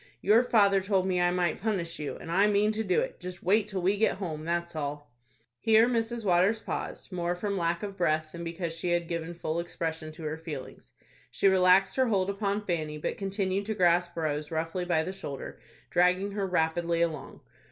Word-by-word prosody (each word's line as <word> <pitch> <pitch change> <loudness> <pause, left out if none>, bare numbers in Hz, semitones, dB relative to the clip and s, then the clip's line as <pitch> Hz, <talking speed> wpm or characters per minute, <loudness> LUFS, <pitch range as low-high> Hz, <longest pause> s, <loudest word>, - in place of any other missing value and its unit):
Your 215 +4 +5
father 200 -5 +4
told 190 -1 +1
me 180 -1 +1
I 175 - +4
might 175 -2 0
punish 180 -6 -2
you, 150 - -4
and 165 - -8
I 195 +4 +4
mean 210 +1 +3
to 220 +1 -2
do 185 -4 +2
it; - - -5
just 180 -1 -8
wait 205 +3 +3
till 195 -3 -4
we 195 +3 +2
get 220 -2 +2
home, 160 -5 -5
that's 170 0 -2
all." 145 -1 -4 0.5
Here 225 +1 +5
Mrs. 230 -1 -1
Waters 190 +4 +3
paused 220 - -5
more 175 -1 -1
from 200 +2 -2
lack 170 -1 -1
of 200 -1 -5
breath, 155 -2 +1
than 170 0 -7
because 170 0 -4
she 165 +2 -3
had 170 -1 0
given 170 0 -4
full 165 0 -2
expression 160 -2 -4
to 160 - -10
her 155 +1 -3
feelings. 150 -5 -8 0.4
She - - +1
relaxed 190 +2 +4
her 260 -1 +3
hold 200 -3 +1
upon 200 +1 -2
Fanny, 155 -4 -2
but 150 - -3
continued 195 0 -2
to 220 - -1
grasp 175 -1 +2
Rose 150 -2 -2
roughly 165 +3 -2
by 160 -3 +1
the 185 +3 -4
shoulder, 140 -8 -7 0.3
dragging 180 +3 +3
her 200 -1 -2
rapidly 170 -1 +1
along. 165 -2 -4
180 Hz, 205 wpm, -29 LUFS, 165-200 Hz, 0.5 s, Your